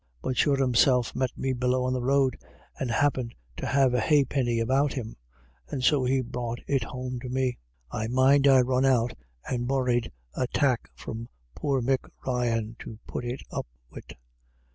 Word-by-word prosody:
But 130 - -1
sure 140 0 +3
Himself 125 -1 +3
met 130 -1 +1
him 130 -1 -1
below 125 0 +1
on 130 0 0
the 130 - -1
road, 135 0 +2 0.4
and 130 - -2
happint 125 -1 +1 0.2
to - - -3
have 135 -2 +3
a 125 - +2
ha'pinny 135 -3 +2
about 135 +5 +2
him, 115 -4 -5 0.5
and 135 -4 -3
so 140 -1 +4
he 130 +1 +2
brought 120 -1 -4
it 135 -4 +1
home 125 +1 -5
to 125 +1 -7
me. 130 -1 -1 0.3
I 110 +1 -2
mind 135 +3 +4
I 135 -2 +7
run 130 +1 +1
out 125 -3 +3 0.3
and 120 -1 -2
borried 125 -3 +1 0.2
a 125 - 0
tack 130 -4 +1
from 115 +1 -7 0.2
poor 135 - -1
Mick 130 +1 0 0.2
Ryan 115 -3 -1
to 110 - -8
put - - -5
it 120 +2 -4
up - - -4 0.2
wid. - - -11
125 Hz, 175 wpm, -27 LUFS, 120-135 Hz, 0.5 s, I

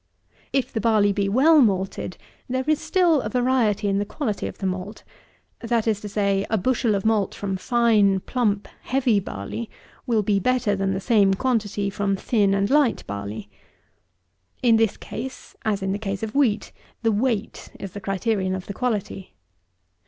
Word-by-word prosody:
If 265 -1 -1
the 220 - -1
barley 215 -2 +3
be 200 0 0
well 290 +8 +5
malted, 190 -4 0 0.3
there 260 +1 0
is 310 0 +1
still 345 -6 +3
a 210 - -4
variety 245 -4 +1
in 195 0 +1
the - - +1
quality 215 0 -3
of - - -8
the 195 - -5
malt; 185 +3 -4 0.6
that 230 -1 0
is 210 -2 +1
to 210 - -6
say, 200 -1 +1
a 220 - +2
bushel 230 +1 +1
of 195 - -3
malt 220 -3 +1
from 195 -1 -3
fine, 210 -2 +3
plump, 210 -5 -1
heavy 250 -5 +2
barley, 190 - -6 0.4
will 225 -3 +2
be 200 0 +2
better 250 -1 +1
than 195 0 -1
the - - -2
same 200 -2 +3
quantity 205 -4 -1
from 200 0 0
thin 200 -1 +1
and 200 +3 0
light 290 -4 +3
barley. 100 +1 -6 1.2
In 230 -2 +5
this 225 -2 +1
case, 260 +3 -8
as 205 -3 0
in 190 - -1
the 200 - -2
case 200 -1 -4
of 220 -1 -4
wheat, 250 -7 +1 0.3
the 225 - +3
weight 220 0 -1
is 195 - -6
the 205 - -8
criterion 195 0 -1
of 190 0 -6
the 200 - -6
quality. 205 - -3
210 Hz, 175 wpm, -23 LUFS, 195-240 Hz, 1.2 s, well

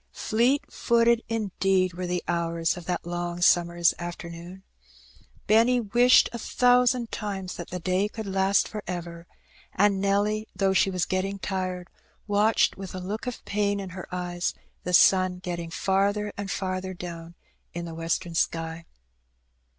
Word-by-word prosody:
Fleet 245 +6 +1
footed 235 0 +3
indeed 195 -4 +1
were 180 +1 -4
the 180 0 -2
hours 170 0 0
of 175 -2 -9
that 180 -1 -3
long 175 0 -3
summer's 175 -1 +3
afternoon. 175 +1 -8 0.8
Benny 230 +4 +4
wished 240 +3 +5
a 235 - -4
thousand 245 0 +3
times 195 -3 -4
that 175 - -7
the 180 - -4
day 185 +4 0
could 220 0 -7
last 195 0 +2
for 210 -1 -6
ever; 170 -1 -6 0.5
and 200 0 +3
Nelly, 205 +2 +1
though 195 -1 +2
she 195 - +3
was 180 -2 -1
getting 195 +1 -2
tired, 185 -2 -3 0.4
watched 210 +2 +2
with 190 -1 -7
a - - -4
look 205 +7 -5
of 250 - -6
pain 205 0 0
in 195 -1 -6
her 185 0 -8
eyes 175 -1 -2 0.3
the 180 - -4
sun 185 0 +5
get 180 -1 -4
ting 170 -1 -6
farther 200 +4 0
and 200 -1 -5
farther 185 -1 -3
down 170 -1 -8 0.4
in 170 0 -4
the 165 - -7
western 165 +1 -2
sky. 165 0 -2
185 Hz, 155 wpm, -26 LUFS, 175-205 Hz, 0.8 s, wished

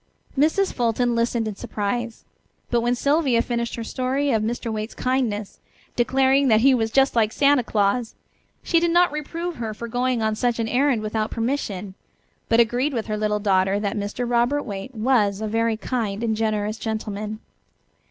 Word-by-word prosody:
Mrs. 315 +8 +2
Fulton 240 0 +1
listened 230 -1 0
in 210 - -4
surprise. 225 +4 -4 0.5
But 240 -1 +2
when 240 +1 +1
Sylvia 280 -3 +2
finished 235 -1 -2
her 230 - -5
story 265 +4 -1
of 220 -3 +2
Mr. 230 +1 -3
Waite's 215 +1 -4
kindness, 240 -6 -1 0.4
declaring 265 +3 +3
that 220 -2 +4
he 270 +2 +6
was 225 -3 +1
just 270 +3 +3
like 220 -2 +3
Santa 280 0 +3
Claus, 220 +2 0 0.5
she 335 - +3
did 340 0 +1
not 350 0 +4
reprove 330 +3 -4
her 220 -2 -4
for 235 +2 -6
going 245 0 0
on 220 0 +1
such 240 +2 0
an 225 -1 -1
errand 250 -1 +1
without 215 0 -1
permission, 225 -6 -3 0.6
but 230 - +4
agreed 245 +5 +2
with 225 - -2
her 215 - -2
little 210 0 0
daughter 195 -1 +2
that 205 +1 -2
Mr. 210 +4 -3
Robert 240 +4 +1
Waite 205 +3 -7
was 215 -4 +2
a 220 - -3
very 225 +1 0
kind 220 -3 -3
and 220 -1 0
generous 215 0 -1
gentleman. 215 -1 -4
230 Hz, 175 wpm, -23 LUFS, 215-255 Hz, 0.6 s, he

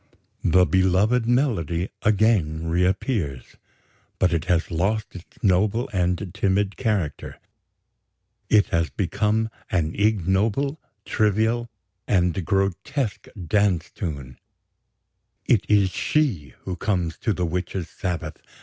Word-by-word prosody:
The 90 +2 +5
beloved 95 +6 +2
melody 100 - +1
again 100 -7 +2
reappears; 90 - -1 0.6
but 90 -2 +2
it 80 -1 0
has 90 0 +1
lost 100 +6 -1
its 90 - -12
noble 100 +5 +2
and 90 0 -1
timid 100 +1 0
character; 105 - -2 1.1
it 105 -2 +4
has 85 -1 +1
become 105 +3 0 0.2
an 80 -3 0
ignoble, 105 - +1 0.3
trivial, 110 +3 +1 0.4
and 90 -1 +1
grotesque 100 - -1 0.2
dance 95 -2 +1
tune: 70 - -6 1.1
it - - +2
is 100 -3 +4
she 95 - 0
who 95 - -4
comes 90 -5 -1
to 110 - 0
the 90 -2 -1
witches' 90 +1 -3
Sabbath.... 90 -4 -4
95 Hz, 105 wpm, -24 LUFS, 85-110 Hz, 1.1 s, The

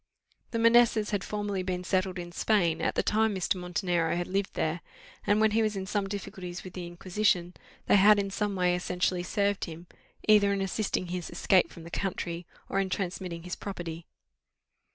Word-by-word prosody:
The 230 - -2
Manessas 230 -2 +4
had 205 -2 -1
formerly 205 -2 -2
been 180 -1 -3
settled 185 0 0
in 175 -1 -6
Spain, 175 -4 +1
at - - 0
the - - +2
time 220 -1 +2
Mr. 185 - +1
Montenero 180 -2 0
had 175 0 -1
lived 195 +2 -2
there; 160 +2 -1 0.5
and 205 +1 +4
when 220 0 +4
he 225 +2 +3
was 215 -1 0
in 190 -1 -3
some 200 0 -1
difficulties 185 -3 -6
with 185 - -9
the 180 -2 -6
Inquisition, 180 0 0 0.3
they - - +5
had 205 +2 +7
in 200 -1 -1
some 205 0 -1
way 180 -1 +2
essentially 180 0 0
served 200 +2 0
him, 165 0 -9 0.4
either 210 -2 +6
in 200 - 0
assisting 195 -2 -1
his 180 -1 -4
escape 180 +1 +3
from 165 - -12
that 170 - -11
country, 175 -3 -3 0.2
or 195 - 0
in 195 -1 0
transmitting 180 -2 -3
his 180 0 -4
property. 170 -4 -6
185 Hz, 190 wpm, -29 LUFS, 175-205 Hz, 0.5 s, had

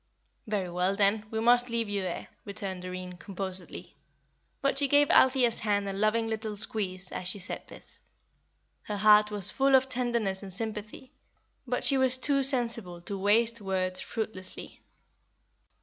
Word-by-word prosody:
"Very 200 -4 -3
well, 180 +2 0
then, 205 +2 +1
we 220 - -3
must 245 +2 +3
leave 230 -1 -2
you 205 -1 -2
there," 185 -2 -5
returned 195 -2 -6
Doreen, 185 0 -7
composedly; 190 0 -5 0.6
but 275 0 0
she 285 - +2
gave 290 +1 +3
Althea's 255 -3 +4
hand 205 -2 -1
a 195 - -3
loving 215 +3 +1
little 220 -1 -4
squeeze 190 -3 -1
as 180 - -5
she 185 - -2
said 185 -1 -5
this. - - -5 0.8
Her 210 - -5
heart 210 0 +5
was 205 -1 0
full 270 0 +3
of 265 0 +3
tenderness 235 -6 -1
and 195 -2 -8
sympathy, 215 +5 -6 0.6
but 245 0 -2
she 275 -2 +6
was 260 -1 +7
too 275 +1 +2
sensible 230 -9 +2
to 200 - -4
waste 225 +4 +2
words 185 -2 -2
fruitlessly. 215 -4 -6
210 Hz, 155 wpm, -28 LUFS, 190-240 Hz, 0.8 s, was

